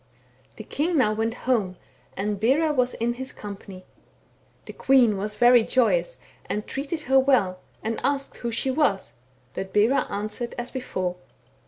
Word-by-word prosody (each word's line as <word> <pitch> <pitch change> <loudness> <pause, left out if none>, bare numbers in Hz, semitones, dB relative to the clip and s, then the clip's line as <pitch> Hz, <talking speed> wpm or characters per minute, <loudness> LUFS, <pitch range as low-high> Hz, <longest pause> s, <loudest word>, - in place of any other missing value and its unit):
" 125 +1 -34
The 220 - -7
king 320 +9 -1
now 215 -6 +3
went 225 +1 -1
home, 210 -8 +1 0.4
and 205 +1 -2
Bera 290 +8 +2
was 250 -2 +1
in 235 +1 -1
his 260 +2 -5
company. 195 -2 -9 0.8
The - - -9
queen 250 -5 +4
was 210 +2 -4
very 240 0 +6
joyous, - - +1 0.3
and 210 - -3
treated 290 +4 -4
her 265 -1 +4
well, 245 -9 +2 0.2
and 225 +1 -2
asked 275 +1 -1
who 235 - -3
she 235 +3 -1
was; 255 -9 0 0.4
but 190 0 -5
Bera 225 +7 +3
answered 215 +4 -4
as 240 +1 -5
before. 185 -8 -3
235 Hz, 160 wpm, -25 LUFS, 205-265 Hz, 0.8 s, very